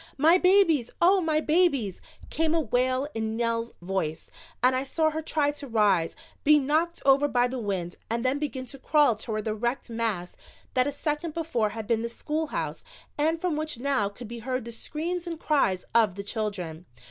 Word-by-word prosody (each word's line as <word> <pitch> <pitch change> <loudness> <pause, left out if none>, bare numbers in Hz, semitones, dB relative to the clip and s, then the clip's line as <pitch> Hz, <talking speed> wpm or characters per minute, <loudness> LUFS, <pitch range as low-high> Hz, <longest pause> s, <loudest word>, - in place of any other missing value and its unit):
"My 325 +6 +5
babies, 360 - +4
Oh, 375 +3 +5
my 310 -2 +1
babies!" 300 - +2 0.3
came 320 0 +1
a - - +3
wail 255 +1 +1
in 220 0 -2
Nell's 230 0 -1
voice, 175 -4 -3 0.3
and 255 +1 +5
I 255 - +1
saw 315 +3 +1
her 315 +1 -3
try 300 -2 +1
to 290 -1 -9
rise, 205 -8 +2 0.3
be 300 0 +7
knocked 310 +5 0
over 275 +1 +5
by 245 -3 +2
the 255 +1 -4
wind 190 -5 -3
and 230 +2 -1
then 265 +3 +1
begin 270 -3 -3
to 270 +2 -10
crawl 290 -4 +3
toward 215 0 -4
the 215 - 0
wrecked 240 +3 -2
mass 220 -6 -2 0.4
that 255 +1 +3
a - - 0
second 300 +2 -3
before 305 -10 0
had 220 +1 -6
been 225 +1 +1
the 235 - -3
schoolhouse 305 +5 -3 0.3
and 320 +3 +1
from 350 -2 -1
which 310 -3 -2
now 260 -5 0
could 230 +3 -10
be 235 +1 -7
heard 255 +1 -3
the 235 - -6
screams 335 +9 -4
and 330 -2 -4
cries 235 - +1
of 220 -5 +4
the 200 - -5
children. 195 -6 -4
255 Hz, 195 wpm, -27 LUFS, 220-310 Hz, 0.4 s, be